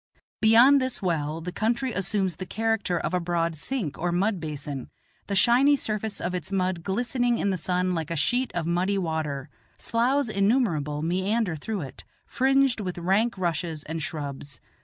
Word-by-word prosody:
Beyond 240 +6 +7
this 260 -1 -2
well 160 -3 -1
the 180 +2 -5
country 235 +5 -1
assumes 195 -2 -1
the 185 - -5
character 225 -4 0
of 165 +1 -2
a 180 - +2
broad 170 -1 -1
sink 175 - -3
or 175 +1 0
mud 190 +3 +1
basin, 145 -4 -5 0.4
the 200 - -2
shiny 250 +7 +5
surface 215 -4 -3
of 180 - -3
its 180 0 -4
mud 185 -2 0
glistening 240 +5 0
in 200 - 0
the - - 0
sun 180 +2 0
like 165 -1 -3
a 170 - -2
sheet 245 - +1
of 170 -2 -1
muddy 180 +4 +1
water. 160 -6 -2 0.3
Sloughs 250 +4 +1
innumerable 195 - +1
meander 190 +3 0
through 200 +6 -4
it, 135 - -9 0.2
fringed 270 -2 +2
with 185 -4 -4
rank 195 +6 +1
rushes 165 -3 -2
and 160 +1 -5
shrubs. 145 -2 -5
185 Hz, 170 wpm, -26 LUFS, 165-225 Hz, 0.4 s, Beyond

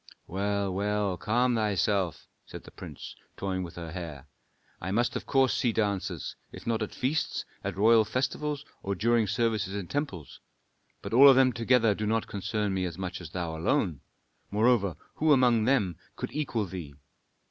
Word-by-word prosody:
"Well, 100 +1 -1
well, 100 0 0
calm 120 +6 +1
thyself," 100 -4 0 0.2
said - - -9
the - - -13
prince, - - -9 0.2
toying 95 -1 -2
with 85 -2 -7
her 85 -2 -7
hair. 80 -6 -7 0.5
"I 90 - -4
must 120 +4 +1
of - - -4
course 135 -2 +3
see 120 - +1
dancers, 105 -3 -2 0.2
if - - -11
not 115 -1 0
at 110 - -4
feasts, 150 +4 -1 0.2
at 100 -2 -4
royal 110 +2 +6
festivals, 140 +5 -2 0.2
or 100 0 -2
during 115 +2 +2
services 105 -2 0
in 100 -2 -3
temples. 140 - -4 0.6
But - - -5
all 140 +4 +9
of 135 - +7
them 130 -1 +5
together 115 -1 +3
do 105 +1 -3
not 110 +1 +1
concern 105 0 -2
me 95 -1 0
as 85 -2 -5
much 95 0 -5
as 85 - -8
thou 85 -1 -4
alone; 85 - 0 0.5
moreover, 105 -3 +2 0.2
who 155 -1 +4
among 120 -4 +4
them 105 - +2 0.2
could 125 - -5
equal 130 -8 -1
thee? 85 -6 -7
105 Hz, 170 wpm, -28 LUFS, 95-120 Hz, 0.6 s, all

